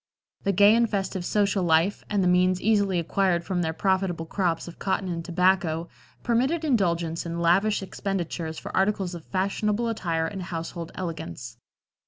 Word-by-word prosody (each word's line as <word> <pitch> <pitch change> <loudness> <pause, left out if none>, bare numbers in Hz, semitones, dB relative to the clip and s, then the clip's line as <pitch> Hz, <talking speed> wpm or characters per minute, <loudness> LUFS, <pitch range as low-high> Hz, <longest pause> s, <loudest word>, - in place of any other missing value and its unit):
The 200 - +3
gay 205 +2 +6
and 235 -1 +3
festive 195 -3 -2
social 200 0 +1
life, 170 +4 +2
and 205 -2 +1
the - - +2
means 180 +1 +3
easily 200 -3 +2
acquired 175 +1 +1
from 180 +1 -1
their 160 -2 0
profitable 190 -1 0
crops 170 -1 -1
of 170 - -10
cotton 190 -1 -1
and 170 -1 -3
tobacco, 175 -2 +1 0.3
permitted 265 +8 +1
indulgence 170 - +1
in 170 0 -4
lavish 195 +5 +2
expenditures 175 -4 -4
for - - -7
articles 190 -2 +1
of 170 -2 -8
fashionable 205 +4 0
attire 170 -7 -1
and 190 +3 -5
household 170 -1 -5
elegance. 120 - -6
185 Hz, 160 wpm, -26 LUFS, 170-200 Hz, 0.3 s, gay